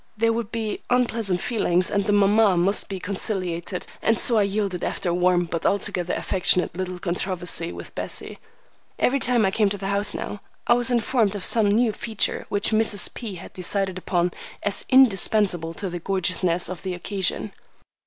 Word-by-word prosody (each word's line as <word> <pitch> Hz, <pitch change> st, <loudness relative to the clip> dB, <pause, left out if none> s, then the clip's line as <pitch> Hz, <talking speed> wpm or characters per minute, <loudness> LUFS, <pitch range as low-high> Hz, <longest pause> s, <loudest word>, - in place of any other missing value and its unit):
There 230 Hz, +1 st, +2 dB
would 230 Hz, -1 st, -3 dB
be 220 Hz, -2 st, -3 dB
unpleasant 230 Hz, -7 st, +1 dB
feelings, 185 Hz, -7 st, +1 dB
and 200 Hz, -1 st, +1 dB
the -, -, +1 dB
mamma 205 Hz, -1 st, +4 dB
must 195 Hz, +4 st, +1 dB
be 195 Hz, -2 st, -4 dB
conciliated, 185 Hz, -2 st, -3 dB, 0.2 s
and 225 Hz, 0 st, +2 dB
so 230 Hz, -3 st, +2 dB
I -, -, +4 dB
yielded 200 Hz, -2 st, -1 dB
after 180 Hz, -, -2 dB
a -, -, +1 dB
warm 180 Hz, 0 st, +2 dB
but 165 Hz, -1 st, -4 dB
altogether 180 Hz, -3 st, 0 dB
affectionate 180 Hz, -1 st, +1 dB
little 185 Hz, 0 st, -4 dB
controversy 175 Hz, -1 st, -2 dB
with -, -, -9 dB
Bessie. -, -, -4 dB, 0.6 s
Every 275 Hz, +2 st, +2 dB
time 245 Hz, -4 st, +3 dB
I 190 Hz, -, +2 dB
came 210 Hz, 0 st, +2 dB
to 200 Hz, -, -3 dB
the 195 Hz, 0 st, -4 dB
house 200 Hz, 0 st, 0 dB
now, 205 Hz, -, -5 dB, 0.2 s
I -, -, +5 dB
was 245 Hz, +1 st, +3 dB
informed 235 Hz, -3 st, +1 dB
of 200 Hz, -, -3 dB
some 225 Hz, -3 st, +3 dB
new 225 Hz, +2 st, +3 dB
feature 220 Hz, 0 st, -2 dB
which 205 Hz, +2 st, 0 dB
Mrs. 215 Hz, -2 st, +2 dB
P. 220 Hz, -6 st, -6 dB
had 175 Hz, -, -11 dB
decided 190 Hz, 0 st, -1 dB
upon 175 Hz, -1 st, 0 dB, 0.3 s
as 205 Hz, 0 st, -1 dB
indispensable 200 Hz, -8 st, +3 dB
to 200 Hz, -, -4 dB
the 175 Hz, -1 st, -5 dB
gorgeousness 180 Hz, -1 st, 0 dB
of 185 Hz, -2 st, -6 dB
the 185 Hz, -2 st, -3 dB
occasion. 195 Hz, +2 st, -2 dB
195 Hz, 180 wpm, -24 LUFS, 180-215 Hz, 0.6 s, I